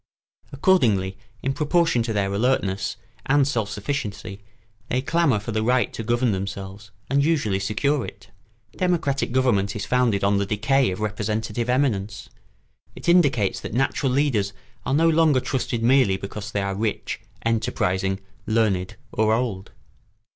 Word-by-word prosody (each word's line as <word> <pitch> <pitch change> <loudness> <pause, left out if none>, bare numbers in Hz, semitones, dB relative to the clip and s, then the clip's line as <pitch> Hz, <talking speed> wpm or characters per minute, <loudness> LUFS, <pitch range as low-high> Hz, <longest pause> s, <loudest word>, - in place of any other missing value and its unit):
Accordingly, 115 - +2 0.3
in 135 - 0
proportion 165 -2 +2
to 115 0 -2
their 100 -2 0
alertness 100 -4 0 0.3
and 140 0 +4
self 115 -7 -1
sufficiency, 105 -5 -4 0.5
they 125 - +1
clamour 140 -4 +2
for 105 +3 -6
the 110 0 0
right 125 0 +1
to - - -5
govern 120 +1 +1
themselves, 100 +1 -5 0.2
and 140 +1 +2
usually 140 -12 +1
secure 120 +8 0
it. - - -10 0.4
Democratic 165 -9 0
government 115 -7 +1
is 100 -1 -3
founded 115 -3 +1
on 100 0 +3
the 100 - 0
decay 130 +6 +2
of 95 +3 -4
representative 110 +2 -2
eminence. 110 -6 0 0.7
It - - -9
indicates 140 - +3
that - - -6
natural 135 +1 +1
leaders 125 -8 +1 0.3
are 135 - +1
no 165 +2 +4
longer 160 -4 +4
trusted 125 -2 -2
merely 120 -6 +4
because 100 +2 -6
they 100 -2 -1
are 100 0 -2
rich, 105 0 -3 0.2
enterprising, 95 -4 0 0.3
learned, 105 -5 +1 0.2
or 110 0 +2
old. 110 -6 -3
115 Hz, 145 wpm, -23 LUFS, 100-135 Hz, 0.7 s, and